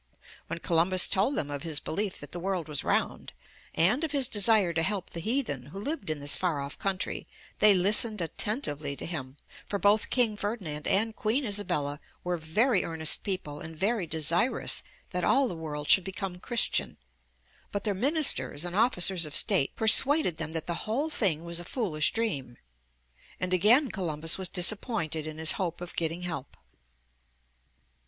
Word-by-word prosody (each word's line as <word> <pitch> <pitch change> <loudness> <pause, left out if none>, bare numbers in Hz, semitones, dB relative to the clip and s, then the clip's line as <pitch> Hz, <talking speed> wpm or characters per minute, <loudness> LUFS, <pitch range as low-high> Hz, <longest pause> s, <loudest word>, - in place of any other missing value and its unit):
When - - -5
Columbus 175 +2 +2
told 205 +9 +1
them 145 - -2
of 145 -1 -5
his 160 -3 0
belief 200 +3 -3
that 145 - -9
the 175 - -6
world 180 -3 -3
was 150 -2 -3
round, - - -2 0.4
and 215 - +2
of 310 -2 -3
his 275 -3 +3
desire 205 -5 +3
to 160 - 0
help 190 +2 -2
the 170 - -6
heathen 215 - -3
who 155 - -11
lived 245 - -5
in 155 -1 -3
this 145 0 0
far 170 -6 -1
off 140 +1 -7
country, 195 -1 -3 0.3
they 210 -2 +8
listened 210 +3 +3
attentively 160 - -3
to - - -6
him, 145 -5 -6 0.3
for 200 - -2
both 205 +3 +2
King 230 -5 +1
Ferdinand 190 -9 -4
and 220 +3 +2
Queen 240 +6 -1
Isabella 150 -9 -2 0.2
were 180 0 -2
very 190 +7 +1
earnest 160 -2 -1
people 155 -7 -4
and 160 0 -9
very 200 0 -1
desirous 165 - +1 0.3
that - - -2
all 275 -1 +3
the 220 - -5
world 150 -2 -6
should 190 - +5
become 190 -1 -6
Christian, 240 +4 +1 0.7
but 200 - -3
their 210 - 0
ministers 195 - +2
and 175 0 -5
officers 190 -6 +3
of 150 - -8
state 135 - +3
persuaded 225 - +5
them 160 0 -5
that 160 -1 -4
the 175 +5 -5
whole 285 +8 -1
thing 170 - 0
was 170 0 -2
a - - -5
foolish 175 - 0
dream; 145 - -3 0.8
and 185 0 -1
again 230 - +4
Columbus 165 -2 0
was 185 - -1
disappointed 175 -5 +1
in 155 0 -7
his 160 0 +4
hope 175 -2 -3
of 175 0 -9
getting 165 +1 -2
help. 165 -6 -6
180 Hz, 175 wpm, -28 LUFS, 160-215 Hz, 0.8 s, they